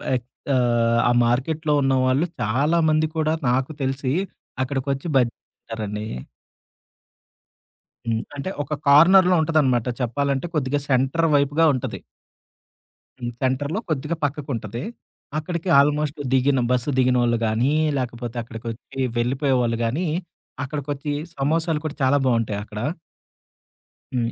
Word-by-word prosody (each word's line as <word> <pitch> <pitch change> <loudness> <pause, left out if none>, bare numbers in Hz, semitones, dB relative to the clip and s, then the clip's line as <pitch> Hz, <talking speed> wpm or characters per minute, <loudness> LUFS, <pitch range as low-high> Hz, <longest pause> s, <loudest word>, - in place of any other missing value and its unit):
ఎక్ 120 - -3 0.3
ఆహ్, 120 -1 +2
ఆ - - +4
మార్కెట్‌లో 150 +6 0
ఉన్న 135 0 +2
వాళ్ళు 130 +6 +2 0.2
చాలామంది 155 +7 +2
కూడా 155 0 +1 0.2
నాకు 130 +4 +1
తెలిసి 135 0 -1 0.5
అక్కడికొచ్చి 135 +3 -2
బజ్జీ‌లు 120 -3 +2 0.2
తింటారండి. 105 -2 -5 2.0
హ్మ్. 115 -1 0
అంటే 145 +7 -4
ఒక 150 +2 -4
కార్నర్‌లో 180 +5 +7
ఉంటదనమాట. 145 -7 +2 0.2
చెప్పాలంటే, 140 +5 0
కొద్దిగా 145 0 0
సెంటర్ 135 +6 +2
వైపుగా 145 +3 +3
ఉంటది. 130 - -4 1.2
హ్మ్. 120 -1 -4
సెంటర్‌లో 140 +8 0
కొద్దిగా 155 +2 -1
పక్కకు 145 0 -4
ఉంటది. 115 +3 -5 0.5
అక్కడికి 170 +3 -3
ఆల్‌మె‌స్ట్ 150 +1 +1
దిగిన 135 0 +3
బస్సు 125 +3 +1
దిగినోళ్ళుగానీ, 120 0 +2 0.2
లాకపోతే 120 -2 -4
అక్కడిక 115 -1 -10
వచ్చి 120 +3 -10 0.2
వెళ్ళిపోయేవాళ్ళు 125 -1 +1
గానీ, 155 +10 -1 0.6
అక్కడికొచ్చి 145 +1 -4 0.2
సమోసాలు 160 +3 0
కూడా 155 - -3
చాలా 130 +2 +4
బావుంటాయి 115 -5 +1
అక్కడ. 105 0 -8 1.4
హ్మ్. 115 -1 0
135 Hz, 110 wpm, -23 LUFS, 120-150 Hz, 2.0 s, కార్నర్‌లో